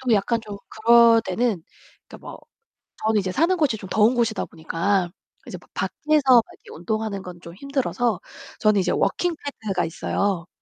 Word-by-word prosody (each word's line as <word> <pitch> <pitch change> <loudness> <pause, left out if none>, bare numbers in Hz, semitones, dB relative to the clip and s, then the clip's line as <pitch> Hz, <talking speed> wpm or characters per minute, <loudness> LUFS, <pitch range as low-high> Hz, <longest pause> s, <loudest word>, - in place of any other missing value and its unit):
저도 250 -3 +2
약간 225 +3 +1
좀 210 -2 -8
그럴 230 +1 +5
때는 195 -2 -1 0.5
그니까 - - -12
뭐 - - -10 0.7
저는 220 -1 +2
이제 185 -1 -3
사는 335 - +2
곳이 295 -9 +1
좀 195 -3 -10
더운 220 +5 +3
곳이다 230 -3 0
보니까 175 +3 -1 0.4
이제 - - -7
막 - - -24
밖에서 305 0 0
막 235 - +7
이렇게 - - -18
운동하는 210 +3 -3
건 180 -2 -10
좀 170 -1 -11
힘들어서 250 -2 -1 0.4
저는 215 -2 +3
이제 - - 0
워킹 350 -2 0 0.3
패드가 195 -3 -1
있어요. 175 +1 -2
215 Hz, 350 characters per minute, -23 LUFS, 190-235 Hz, 0.7 s, 막